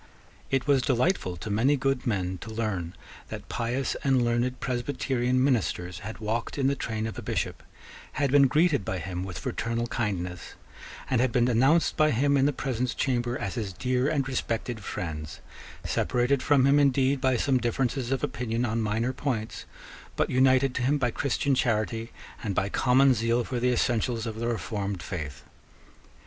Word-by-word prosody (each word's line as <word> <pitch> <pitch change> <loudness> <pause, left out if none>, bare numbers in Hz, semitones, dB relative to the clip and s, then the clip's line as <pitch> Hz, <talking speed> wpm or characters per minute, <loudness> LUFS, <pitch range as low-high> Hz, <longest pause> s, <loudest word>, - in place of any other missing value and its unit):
It 135 -1 0
was 140 -2 +4
delightful 125 - +1
to 105 +5 -5
many 130 +8 +3
good 135 -1 -1
men 95 -4 -1
to 115 - -8
learn 105 -7 -3 0.3
that - - -7
pious 125 +3 -1
and 130 -3 +3
learned 120 +2 0
Presbyterian 125 0 0
ministers 95 -8 0
had 105 +1 -7
walked 115 +4 -3
in 135 - 0
the 140 +1 +3
train 110 -4 -3
of 110 -4 -5
a - - -5
Bishop, - - -3 0.5
had 140 -2 0
been 140 -1 +6
greeted 150 - +2
by 95 - -3
him 90 +1 -4
with 95 -3 -6
fraternal 115 +1 -2
kindness, 95 -7 -3 0.5
and 125 -3 +2
had 130 -1 +2
been 120 0 +3
announced 135 +8 +3
by 155 0 +4
him 140 +3 +2
in 135 0 +4
the - - +2
presence 125 -2 -2
chamber 120 -2 0
as 95 - -3
his 105 -5 -4
dear 125 +7 0
and 140 -4 0
respected 120 -3 -3
friends, 75 -5 -5 0.4
separated 125 +2 +1
from 140 -3 +4
him 140 +1 +5
indeed 135 -1 +3
by 130 -2 +2
some 130 +2 +2
differences 120 +1 -1
of 135 -2 -1
opinion 115 +1 -1
on 115 0 -1
minor 110 +4 0
points, 125 -5 -3 0.5
but - - 0
united 130 0 +4
to 130 - -2
him 135 +4 +2
by 125 -4 0
Christian 140 +2 0
charity 115 -2 0 0.3
and 100 -4 -2
by 100 - +1
common 130 +4 +4
zeal 115 +1 +1
for 125 +1 -3
the 125 +1 +2
essentials 120 -1 0
of 110 -1 -5
the 115 - -1
reformed 100 -4 -3
faith. 75 -6 -6
120 Hz, 175 wpm, -27 LUFS, 110-135 Hz, 0.5 s, been